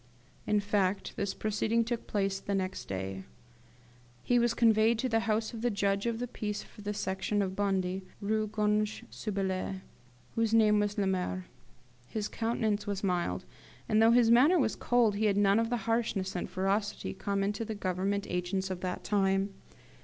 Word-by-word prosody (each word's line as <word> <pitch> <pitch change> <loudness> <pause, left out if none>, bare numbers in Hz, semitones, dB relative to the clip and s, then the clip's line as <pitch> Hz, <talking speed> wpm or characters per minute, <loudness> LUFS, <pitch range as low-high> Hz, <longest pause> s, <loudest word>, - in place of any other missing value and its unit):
In 210 0 +3
fact, 200 -1 0
this 200 -1 -2
proceeding 220 +2 +1
took 235 0 -4
place 195 -2 -1
next 190 -1 -2
day. 95 0 -4 1.0
He 245 -1 +3
was 235 -1 +2
conveyed 225 0 +4
to 255 - 0
the 225 -2 +2
house 220 +2 0
of 225 - -6
the 245 - +2
judge 200 0 0
of 230 -1 -1
the 245 +1 -3
peace 210 -3 -4
for - - -15
the 205 0 -3
Section 200 +1 -1
of 190 -1 -3
Bondy, 190 -2 0 0.2
Rue 215 +1 0
Grange 210 +1 0
sue 215 - -5
Belles, 190 -1 -1 0.6
whose 225 -1 +1
name 210 -2 +5
was 205 0 -1
Lemaire. 185 -2 -1 0.6
His 210 - -3
countenance 220 -2 -1
was 200 -1 -3
mild; 175 - -1 0.4
and 215 0 +3
though 225 - +7
his 235 -1 +5
manner 280 +10 +6
was 240 -8 +1
cold, 235 -4 +2
he 220 - +1
had 200 -2 +2
none 200 +1 +4
of 230 0 0
the 245 - 0
harshness 225 -5 0
and 175 - -3
ferocity 195 +3 -1
common 200 +1 -1
to 210 - -4
the 220 -1 -4
Government 195 +1 -1
agents 180 +2 -2
of 185 - -3
that 180 -1 -3
time. 195 -1 +1
205 Hz, 175 wpm, -30 LUFS, 195-225 Hz, 1.0 s, though